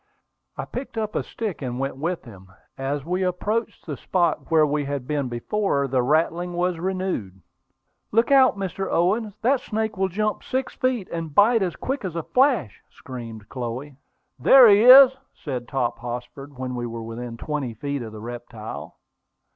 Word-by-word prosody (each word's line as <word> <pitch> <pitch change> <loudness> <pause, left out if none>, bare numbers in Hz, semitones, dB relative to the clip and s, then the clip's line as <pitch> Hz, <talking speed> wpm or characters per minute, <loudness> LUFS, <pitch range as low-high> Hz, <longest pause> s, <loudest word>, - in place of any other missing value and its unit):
I - - -3
picked 255 -2 -7
up 215 -1 -2
a - - 0
stick, 215 -8 -5
and 125 -2 -3
went 135 +1 -2
with 165 +5 -3
him. 95 -5 -14 0.2
As 135 +1 -3
we 180 +3 -1
approached 205 +5 -2
the 150 - -4
spot 170 +2 0
where 160 -2 +5
we 145 0 -1
had 140 -2 -3
been 145 -4 -1
before, 140 - -1
the 130 -1 +1
rattling 165 +6 +1
was 175 -1 -1
renewed. 185 - -3 0.7
"Look 230 +5 +2
out, 260 -5 +6
Mr. 195 0 -3
Owen! 205 +4 +1
That 260 +3 +3
snake 220 -3 -3
will 190 0 +1
jump 210 +3 -2
six 260 0 -2
feet, 255 -7 -1
and 165 -3 -5
bite 225 +2 +5
as 180 -4 -1
quick 270 +6 -3
as 180 -4 -4
a 165 - -2
flash," 250 - +1
screamed 115 -5 -9
Chloe. 130 +3 -5 0.4
"There 255 - +8
he 205 -1 +6
is," 265 +1 +10 0.2
said 125 -5 -5
Hop 120 -3 -1
Tossford, 125 +3 -7
when 130 0 -4
we 120 -1 -3
were 115 0 -6
within 115 +1 -7
twenty 140 -4 -4
feet 140 +3 -3
of 115 -2 -7
the 105 -1 -9
reptile. 115 -1 -8
155 Hz, 175 wpm, -24 LUFS, 125-205 Hz, 0.7 s, is